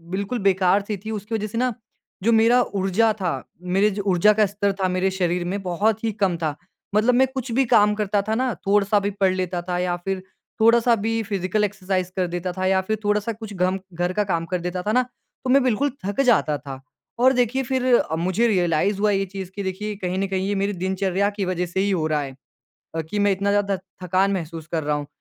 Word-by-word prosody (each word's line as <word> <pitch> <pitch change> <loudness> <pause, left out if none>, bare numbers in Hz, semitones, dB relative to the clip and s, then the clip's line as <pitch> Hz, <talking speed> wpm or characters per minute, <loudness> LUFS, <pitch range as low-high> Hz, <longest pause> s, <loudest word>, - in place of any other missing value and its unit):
बिल्कुल 200 +5 -2
बेकार-सी 195 +2 +1
थी। 220 - -3
उसकी 210 +3 -5
वजह 215 0 -2
से 220 +2 -6
ना 255 - +1 0.5
जो 230 - +4
मेरा 245 +2 +5 0.2
ऊर्जा 200 +4 +3
था, 180 - +1 0.5
मेरे 210 +2 +4
जो 205 - -3
ऊर्जा 185 +4 +5
का - - +6
स्तर 200 -1 0
था 185 - +3
मेरे 190 +1 +2
शरीर 175 0 0
में, 200 - -3
बहुत 205 +5 0
ही 225 - +1
कम 180 -3 +2
था। 150 -2 -1 0.4
मतलब 220 +4 +4
मैं 265 - +5
कुछ 255 -2 -3
भी 270 - +4
काम 210 0 +5
करता 205 0 +1
था 220 - +1
ना, 255 -3 0
थोड़ा-सा 205 +1 +3
भी 200 0 -1
पढ़ 190 -1 +4
लेता 180 -1 -2
था 175 - 0
या 180 -1 0
फिर 190 -1 -2 0.4
थोड़ा-सा 235 +1 +5
भी 225 - 0 0.2
फिज़िकल 200 +1 0
एक्सरसाइज़ 190 -2 -3
कर 185 -1 +1
देता 175 +1 -2
था 185 - -1
या 190 0 +3
फिर 220 - +1
थोड़ा-सा 210 +2 +1
कुछ 220 -2 -7
घम 185 0 0 0.2
घर 180 +1 0
का - - +4
काम 165 -2 0
कर 180 - 0
देता 180 +1 -2
था 210 - 0
ना, 255 - +5 0.4
तो 255 - -3
मैं 275 - +6
बिल्कुल 255 +3 +1 0.2
थक 200 +6 0
जाता 155 -10 +3
था। 135 0 -8 0.4
और 260 +2 +5
देखिए, 250 +1 +1
फिर 260 0 -1
अ, 160 - +1
मुझे 225 +6 +2
रियलाइज़ 185 0 +1
हुआ 210 0 +3
ये 195 0 +1
चीज़ 190 -2 -6
कि 200 - -4
देखिए, 205 +3 -4
कहीं 185 -2 -3
न 195 - 0
कहीं 190 0 -1
ये 205 - 0
मेरी 205 +1 0
दिनचर्या 190 +1 0
की 200 - 0
वजह 180 0 -1
से 190 - 0
ही - - +1
हो 170 -5 0
रहा 150 - +1
है 140 -1 -5 0.6
अ, 165 - -1
कि 210 - -2
मैं 205 0 +3
इतना 200 +1 0
ज़्यादा 200 -1 +1 0.3
थकान 190 +3 +2
महसूस 165 -1 -7
कर 160 - 0
रहा 150 - +2
हूँ। - - -10
195 Hz, 235 wpm, -23 LUFS, 185-215 Hz, 0.6 s, का